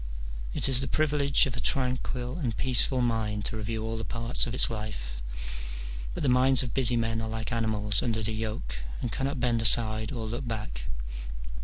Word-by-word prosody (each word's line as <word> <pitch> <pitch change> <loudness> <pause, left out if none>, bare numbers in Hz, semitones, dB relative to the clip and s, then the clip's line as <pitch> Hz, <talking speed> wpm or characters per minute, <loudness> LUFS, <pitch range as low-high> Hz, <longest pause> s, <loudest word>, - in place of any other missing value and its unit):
It - - +6
is 130 -1 +7
the 135 - 0
privilege 145 -2 +3
of 130 -2 -3
a - - -2
tranquil 125 +2 -1
and 120 -8 -2
peaceful 130 0 +5
mind 110 -3 -1
to 110 - -3
review 110 +1 -3
all 110 0 -3
the - - -4
parts 115 +2 -1
of 120 - -3
its - - +4
life: 105 - -5 0.9
but - - -3
the - - +2
minds 130 +1 +6
of 120 - -5
busy 125 -2 +3
men 115 -1 0
are 110 - -3
like 110 +1 -4
animals 110 -3 0
under 110 -2 -1
the 110 +1 -2
yoke, 110 - -4 0.2
and 120 - -3
cannot 135 +2 -2
bend 120 -2 +1
aside 110 -1 +2
or 115 -5 -4
look 120 +4 -4
back. 105 - -4
115 Hz, 190 wpm, -28 LUFS, 110-125 Hz, 0.9 s, is